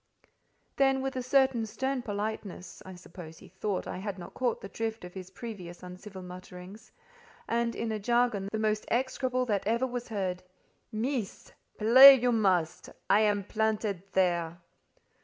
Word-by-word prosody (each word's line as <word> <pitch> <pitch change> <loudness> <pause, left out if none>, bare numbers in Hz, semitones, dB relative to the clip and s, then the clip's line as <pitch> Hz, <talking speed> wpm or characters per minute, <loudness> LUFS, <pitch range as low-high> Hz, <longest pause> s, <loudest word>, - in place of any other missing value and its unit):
Then, 270 -1 +3
with 270 0 -3
a 255 - -2
certain 255 -3 +2
stern 265 +4 -2
politeness 210 -4 -5
(I 190 -1 -10
suppose 175 -2 -11
he - - -14
thought 190 +1 -3
I - - -5
had 200 0 -5
not 175 - -10
caught 245 -3 -1
the - - -7
drift 225 0 -4
of 180 - -11
his 185 -1 -8
previous 190 -5 -9
uncivil 185 +1 -9
mutterings), 180 +3 -11 0.6
and 235 0 0
in 230 - -3
a 215 - -2
jargon 235 -3 +1
the 220 - -2
most 215 0 0
execrable 255 +1 0
that 205 -4 -1
ever 235 +3 +1
was 245 -1 -5
heard, 190 -5 -3 0.5
"Meess——, 230 -1 -3 0.3
play 260 +6 +10
you 250 -1 +1
must: 185 -7 +1 0.2
I 205 - +6
am 205 -2 +2
planted 215 -2 -1
there." 175 -3 +1
215 Hz, 155 wpm, -29 LUFS, 185-240 Hz, 0.6 s, play